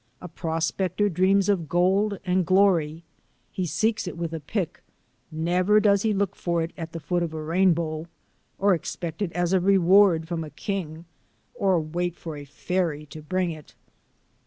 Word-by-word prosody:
A 180 - -8
prospector 170 +4 -1
dreams 190 +3 +2
of 180 -7 0
gold 195 +4 +2
and 185 0 +2
glory. 175 -4 +2 0.5
He 185 -2 -2
seeks 215 +6 0
it 175 - -6
with 165 -1 -4
a 165 - -3
pick; 175 +3 -4 0.5
never 180 +6 +2
does 200 -2 +3
he 220 - +1
look 200 -1 -1
for 170 -1 -1
it 165 - -6
at 165 -3 -7
the 165 - -4
foot 175 +3 -1
of 170 - -1
the 160 - -7
rainbow, 165 -1 +1 0.5
or 200 0 +3
expect 170 0 -4
it 190 -5 -1
as 175 +1 0
a 190 - +4
reward 185 -2 +4
from 165 -1 -3
a 155 - -8
king, 165 0 -5 0.5
or 190 -3 +2
wait 175 +2 -3
for 160 -3 -7
a 145 -1 -8
fairy 155 +1 -2
to 155 - -8
bring 180 +3 -1
it. 155 -2 -11
175 Hz, 175 wpm, -25 LUFS, 160-190 Hz, 0.5 s, a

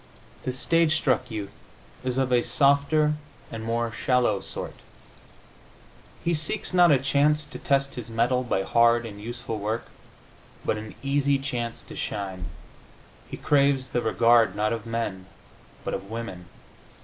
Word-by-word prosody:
The 130 - 0
stage 160 +5 +2
struck 130 -5 +1
youth 105 -3 -5 0.5
is 130 0 -1
of 130 -1 +1
a 120 - +5
softer 145 +3 +3 0.4
and 115 -1 -6
more 115 +1 -1
shallow 120 -3 +1
sort. - - -5 1.5
He 170 - +1
seeks, 160 +6 -1
not 175 -2 +6
a 140 - +6
chance 145 +3 +2
to 150 - -9
test 140 0 +1
his 120 -2 -6
mettle 120 +3 +1
by 115 -6 -1
hard 115 +2 +4
and 105 -2 -8
useful 115 -1 -5
work, 110 +3 -3 0.8
but 110 - 0
an 110 0 -9
easy 140 0 +2
chance 120 -4 -4
to - - -11
shine. 95 -3 -4 0.8
He - - -6
craves 140 -2 +2
the 120 - 0
regard, 115 0 +4
not 110 +2 +1
of 115 -1 -5
men, 115 -5 -3 0.6
but - - -3
of 100 - -5
women. 115 -6 -6
120 Hz, 150 wpm, -26 LUFS, 115-140 Hz, 1.5 s, not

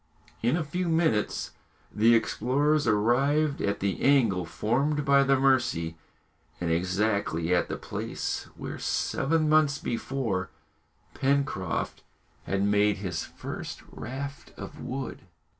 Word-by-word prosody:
In 120 +8 +2
a 170 - -1
few 175 +4 -2
minutes 160 -11 +1 0.4
the 115 +2 +5
explorers 140 +6 +1
arrived 135 +8 +2
at 100 0 -1
the 100 -1 -1
angle 115 -11 +3
formed 140 - 0
by 140 -1 +5
the 135 -1 +3
Mercy, 125 -12 +2 0.6
and 85 -1 -1
exactly 90 -1 0
at 90 - +2
the - - -3
place - - -4
where, - - -6
seven 155 +3 0
months 155 -2 +4
before, 115 -7 -2 0.6
Pencroft 135 - -1 0.4
had 95 0 0
made 105 0 +3
his 95 -3 -3
first - - -7
raft 140 +4 -7
of - - -8
wood. 130 +1 -5
125 Hz, 120 wpm, -28 LUFS, 100-140 Hz, 0.6 s, the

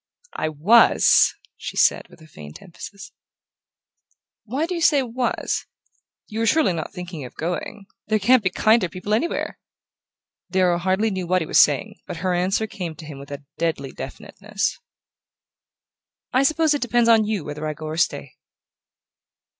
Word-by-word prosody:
"I 155 - -2
WAS," 180 +11 +5 0.2
she - - -7
said - - +3
with - - -18
a 155 - -15
faint 75 - -12
emphasis. 195 +2 -11 1.3
"Why 265 +8 -1
do 360 - -4
you 340 - -3
say 290 -4 +4
'was'? 245 0 -2 0.6
You're 225 +1 -2
surely 245 - +3
not 160 -2 -5
thinking 180 -5 -7
of 125 - -10
going? 180 +4 -4 0.2
There 215 0 +2
can't 235 +5 +4
be 185 - +1
kinder 215 0 +3
people 190 +4 -4
anywhere." 250 +11 -1 0.9
Darrow 180 -1 +2
hardly 190 +5 +1
knew 185 -2 -4
what 185 -1 +2
he - - -6
was - - +3
saying; 145 -3 +3
but 180 -3 -6
her 185 - +1
answer 185 +5 0
came 180 -6 -6
to 155 - -11
him 145 -2 -9
with 140 +1 -11 0.3
deadly 160 -5 -2
definiteness. - - -5 1.5
"I 260 - +4
suppose 315 +2 +3
it 290 - -2
depends 240 -1 +2
on 225 -2 +5
you 210 -5 -2
whether 150 +1 -5
I 155 - -3
go 155 +1 -9
or 155 +1 -5
stay." 145 -6 -1
185 Hz, 160 wpm, -22 LUFS, 160-225 Hz, 1.5 s, WAS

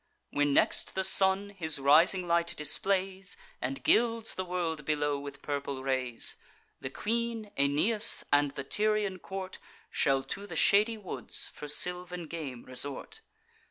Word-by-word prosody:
When 145 0 +1
next - - +2
the 190 - 0
Sun 190 +1 +4
his 160 -6 0
rising 165 +7 +4
light 170 0 +1
displays, 190 +5 -1 0.2
And 135 +2 -4
gilds 230 -1 +2
the 185 - -3
world 175 -4 -3
below 145 -1 -1
with 140 -1 -10
purple 140 -2 -4
rays, 130 -3 +1 0.4
The 130 - -5
queen, 225 - -3
Aeneas, 155 +11 +4
and 145 0 +4
the 140 0 -7
Tyrian 210 +3 0
court 190 0 -7 0.3
Shall 135 -1 +1
to 200 +7 -7
the - - -8
shady 215 +3 +4
woods, 205 -4 -4
for 150 - -9
sylvan 180 +3 -2
game, 150 -7 -7
resort. 140 - -5
170 Hz, 140 wpm, -29 LUFS, 145-200 Hz, 0.4 s, Sun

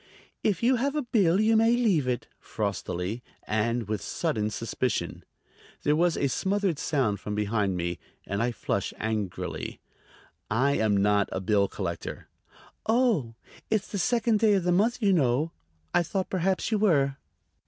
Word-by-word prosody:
"If 210 +1 +1
you 250 +2 +4
have 275 +4 0
a 300 - 0
bill 195 -7 +3
you 220 +1 +4
may 225 +2 +5
leave 200 - +2
it," 125 -2 -1
frostily 90 +7 -3 0.2
and 115 +1 0
with 105 -1 -2
sudden 110 -11 -1
suspicion. 110 -4 -2 0.6
There 150 - +3
was 170 +1 +2
a 140 - +2
smothered 190 +2 0
sound 120 -10 0
from 105 +1 -4
behind 105 -2 0
me, 85 0 -2 0.3
and 100 +2 -2
I 120 +1 +1
flushed 115 - -2
angrily. 110 -4 -3 0.7
"I 130 +6 +2
am 110 -6 +2
not 100 0 +3
a - - -2
bill 100 +1 +2
collector." 85 -5 -5 0.6
"Oh; 220 - +2 0.3
it's 215 -2 0
the 200 - -3
second 230 +2 +2
day 215 -2 +4
of 190 - +1
the 180 - +2
month, 220 +7 +2
you 200 -2 +4
know. 145 0 +2 0.4
I - - +4
thought 190 +3 -3
perhaps 190 +3 0
you 215 - +2
were." 140 -9 +3
140 Hz, 160 wpm, -27 LUFS, -, 0.7 s, may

